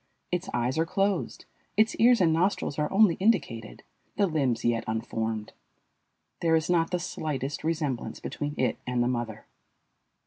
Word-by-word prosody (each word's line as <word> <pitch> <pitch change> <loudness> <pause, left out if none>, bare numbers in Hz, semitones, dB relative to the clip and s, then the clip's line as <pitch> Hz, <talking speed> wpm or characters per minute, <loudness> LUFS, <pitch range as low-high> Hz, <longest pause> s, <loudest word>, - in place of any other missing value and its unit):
Its 180 +1 -2
eyes 125 +5 0
are 165 - +3
closed, 195 0 -1 0.3
its 220 +1 +4
ears 240 +1 +6
and 165 -3 +4
nostrils 165 -3 0
are 150 - 0
only 200 -2 +5
indicated, 165 - 0 0.3
the 200 - +3
limbs 135 -9 0
yet 115 -1 +2
unformed. 110 -1 -3 0.9
There 165 -1 +3
is 160 +2 +1
not 165 -2 +3
the 180 - 0
slightest 145 -4 -4
resemblance 155 -6 -2
between 145 0 -4
it 130 - +1
and 125 -1 +1
the - - +1
mother. 120 -3 -3
155 Hz, 150 wpm, -28 LUFS, 120-180 Hz, 0.9 s, ears